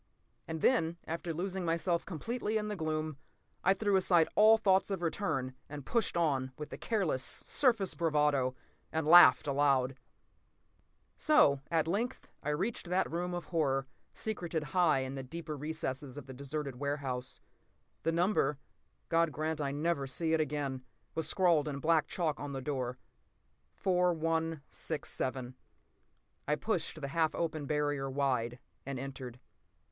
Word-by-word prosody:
And 160 Hz, -1 st, -4 dB
then, 170 Hz, -10 st, +3 dB
after 165 Hz, +1 st, -3 dB
losing 185 Hz, +3 st, -3 dB
myself 170 Hz, +1 st, 0 dB
completely 220 Hz, +5 st, -2 dB
in 210 Hz, 0 st, -2 dB
the 210 Hz, -, -2 dB
gloom, 155 Hz, -3 st, -2 dB, 0.4 s
I 190 Hz, +1 st, +4 dB
threw 205 Hz, 0 st, +1 dB
aside 175 Hz, -3 st, +4 dB
all 220 Hz, +1 st, +7 dB
thoughts 195 Hz, -3 st, +3 dB
of 190 Hz, -3 st, -3 dB
return 135 Hz, -7 st, -1 dB, 0.2 s
and 145 Hz, -2 st, -7 dB
pushed 230 Hz, -, 0 dB
on 135 Hz, -6 st, +1 dB
with 150 Hz, -, -7 dB
a -, -, -5 dB
careless, 185 Hz, -, 0 dB
surface 225 Hz, -9 st, +1 dB
bravado, 150 Hz, -6 st, +1 dB, 0.4 s
and 160 Hz, -1 st, -1 dB
laughed 175 Hz, +3 st, +8 dB
aloud. 135 Hz, -2 st, +2 dB, 1.2 s
So, 220 Hz, -, +4 dB
at 160 Hz, -1 st, +1 dB
length, 225 Hz, +9 st, -2 dB
I 150 Hz, -, -3 dB
reached 180 Hz, +5 st, -2 dB
that 180 Hz, +1 st, +1 dB
room 175 Hz, +2 st, -2 dB
of 175 Hz, -, -5 dB
horror, 135 Hz, -5 st, 0 dB, 0.3 s
secreted 175 Hz, -7 st, -3 dB
high 170 Hz, -7 st, +4 dB
in 130 Hz, 0 st, -4 dB
the 135 Hz, -, -4 dB
deeper 155 Hz, +4 st, -6 dB
recesses 145 Hz, -3 st, -4 dB
of 145 Hz, -, -7 dB
the 135 Hz, -, -9 dB
deserted 140 Hz, 0 st, -4 dB
warehouse. 135 Hz, -2 st, -2 dB, 0.6 s
The 165 Hz, -, +1 dB
number—God 165 Hz, -1 st, 0 dB
grant 155 Hz, +1 st, -2 dB
I 140 Hz, -1 st, -1 dB
never 145 Hz, -1 st, -1 dB
see 160 Hz, +4 st, -1 dB
it 160 Hz, -, +3 dB
again!—was 145 Hz, +2 st, -4 dB
scrawled 170 Hz, -6 st, +3 dB
in 145 Hz, -2 st, -3 dB
black 160 Hz, +1 st, +2 dB
chalk 160 Hz, -5 st, -1 dB
on 145 Hz, 0 st, -5 dB
the 135 Hz, -, -4 dB
door—4167. 150 Hz, -, -2 dB, 0.9 s
I 150 Hz, -, +3 dB
pushed 165 Hz, -2 st, -2 dB
the 140 Hz, -, -3 dB
half 160 Hz, +1 st, +1 dB
open 155 Hz, -3 st, -2 dB
barrier 145 Hz, -2 st, 0 dB
wide, 130 Hz, -3 st, 0 dB, 0.3 s
and 135 Hz, 0 st, -4 dB
entered. 130 Hz, -2 st, -7 dB
155 Hz, 140 wpm, -32 LUFS, 140-175 Hz, 1.2 s, laughed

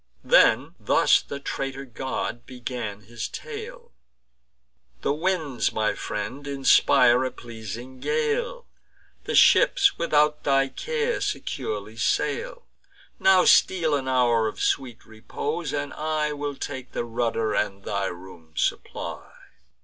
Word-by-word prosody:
Then -, -, +4 dB
thus -, -, +4 dB
the 140 Hz, -, -7 dB
traitor 135 Hz, 0 st, -4 dB
god 120 Hz, -1 st, -4 dB
began 120 Hz, -5 st, -5 dB
his 115 Hz, +2 st, -6 dB
tale: 470 Hz, +2 st, -8 dB, 1.1 s
"The -, -, +1 dB
winds, 160 Hz, -5 st, -1 dB
my 110 Hz, -1 st, 0 dB
friend, 130 Hz, +7 st, -5 dB
inspire 130 Hz, -2 st, +4 dB
a 130 Hz, -, 0 dB
pleasing 120 Hz, +2 st, -9 dB
gale; 475 Hz, -, -1 dB, 0.6 s
The -, -, -2 dB
ships, 400 Hz, -5 st, +5 dB
without 150 Hz, -2 st, +2 dB
thy 135 Hz, -1 st, +2 dB
care, 470 Hz, -, -2 dB
securely 435 Hz, -, -4 dB
sail. -, -, -1 dB, 0.5 s
Now 190 Hz, -1 st, +5 dB
steal 165 Hz, -5 st, +4 dB
an 135 Hz, -2 st, -1 dB
hour 120 Hz, -3 st, +3 dB
of 110 Hz, -, -6 dB
sweet 125 Hz, -4 st, -1 dB
repose; 145 Hz, +8 st, -4 dB
and 145 Hz, 0 st, -3 dB
I 155 Hz, -1 st, -1 dB
Will 145 Hz, -1 st, -4 dB
take 130 Hz, -2 st, -7 dB
the -, -, -2 dB
rudder 115 Hz, -1 st, -1 dB
and 100 Hz, -1 st, -1 dB
thy 100 Hz, -1 st, -2 dB
room 85 Hz, -3 st, -10 dB
supply." -, -, -3 dB
135 Hz, 120 wpm, -25 LUFS, 120-170 Hz, 1.1 s, ships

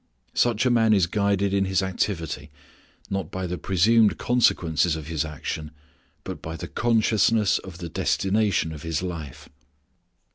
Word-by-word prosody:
Such 120 Hz, 0 st, +2 dB
a 125 Hz, -, +3 dB
man 115 Hz, -2 st, +4 dB
is 95 Hz, -4 st, +4 dB
guided 100 Hz, +1 st, 0 dB
in 100 Hz, -1 st, +2 dB
his 95 Hz, 0 st, +1 dB
activity 85 Hz, -6 st, -3 dB, 0.6 s
not 95 Hz, -1 st, -2 dB
by 95 Hz, 0 st, -4 dB
the 90 Hz, 0 st, -4 dB
presumed 105 Hz, +4 st, +3 dB
consequences 85 Hz, -9 st, +2 dB
of 80 Hz, -2 st, -6 dB
his 80 Hz, -2 st, -2 dB
action, 75 Hz, 0 st, -5 dB, 0.5 s
but -, -, -7 dB
by 80 Hz, 0 st, -6 dB
the -, -, -6 dB
consciousness 110 Hz, -2 st, +2 dB
of 95 Hz, -3 st, -10 dB
the 85 Hz, -1 st, -6 dB
destination 95 Hz, 0 st, 0 dB
of 75 Hz, -, -9 dB
his 80 Hz, +1 st, -2 dB
life. 80 Hz, -7 st, -6 dB
95 Hz, 150 wpm, -24 LUFS, 80-105 Hz, 0.6 s, man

